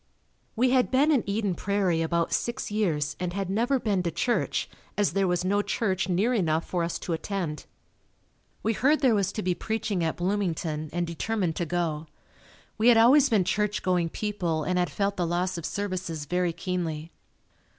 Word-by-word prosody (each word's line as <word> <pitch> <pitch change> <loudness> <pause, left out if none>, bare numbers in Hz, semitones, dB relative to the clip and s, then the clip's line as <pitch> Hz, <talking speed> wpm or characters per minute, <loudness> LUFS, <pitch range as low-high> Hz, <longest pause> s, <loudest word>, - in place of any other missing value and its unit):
We 250 +2 +3
had 255 -1 +3
been 280 +4 +3
in 270 -7 +3
Eden 200 -1 0
Prairie 185 -2 0
about 165 0 0
six 240 -2 -2
years 165 -9 0
and 180 -1 -2
had 195 -1 -2
never 240 +7 +2
been 205 -5 0
to 175 - -1
church 175 +9 0 0.3
as 205 -7 +2
there 195 0 +2
was 180 0 0
no 205 +2 +2
church 195 -3 -1
near 200 +8 +2
enough 165 -7 +1
for 175 -2 -1
us 170 - -2
to 175 - -4
attend. 165 -2 -4 1.0
We 225 - +1
heard 290 +8 +2
there 260 -5 +4
was 200 -2 +1
to 215 - -3
be 180 0 +1
preaching 215 -2 -2
at 160 - 0
Bloomington, 170 -5 -1
and 175 +1 -1
determined 175 +1 -2
to 170 - -1
go. 165 -2 -2 0.7
We 225 - +3
had 240 -2 +7
always 265 +5 +6
been 215 -6 +3
church 210 +2 -1
going 180 -2 +1
people 175 -6 -2
and 180 +2 0
had 175 - +1
felt 200 0 -1
the 175 -2 0
loss 180 +2 -1
of 170 -2 -4
services 185 -6 -3
very 180 +3 0
keenly. 165 -3 -3
185 Hz, 185 wpm, -27 LUFS, 170-210 Hz, 1.0 s, had